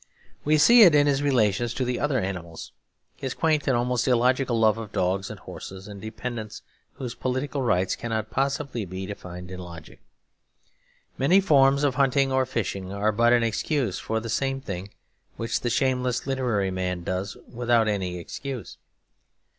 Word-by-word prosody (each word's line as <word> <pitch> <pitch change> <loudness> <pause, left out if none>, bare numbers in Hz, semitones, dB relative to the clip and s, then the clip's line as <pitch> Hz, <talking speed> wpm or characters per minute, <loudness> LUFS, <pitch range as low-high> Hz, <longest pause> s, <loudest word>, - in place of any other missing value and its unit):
We 155 +1 +3
see 235 +11 +7
it 175 -8 +8
in 145 0 +5
his 140 -1 +2
relations 120 -4 +1
to 130 - -1
the 125 0 -1
other 145 -3 +1
animals; 90 -5 -5 0.5
his 130 - -4
quaint 155 -3 +1
and 130 -3 +3
almost 120 0 0
illogical 125 0 +2
love 110 0 +3
of 110 -3 -7
dogs 95 +1 0
and - - -8
horses 95 +1 -9
and 100 -2 -9
dependants 110 0 -6 0.3
whose 125 -3 -6
political 130 +3 -2
rights 95 -7 +1
cannot 110 -2 -3
possibly 135 -3 -1
be 95 0 -6
defined 90 -2 -8
in 90 - -7
logic. 85 -3 -10 1.2
Many 170 +9 +5
forms 140 -6 +4
of 140 -3 +2
hunting 135 0 +2
or 130 -1 +2
fishing 100 -6 -3
are 100 +2 +1
but 120 +3 +3
an 120 -1 +4
excuse 115 - -1
for 110 0 -2
the 115 - -7
same 135 +4 -1
thing 100 -6 -6 0.5
which 115 - -1
the 120 - -2
shameless 125 0 0
literary 125 -8 0
man 90 -1 -3
does 95 +3 -3
without 120 -2 +1
any 95 -4 -1
excuse. 130 +8 -7
120 Hz, 165 wpm, -25 LUFS, 100-135 Hz, 1.2 s, it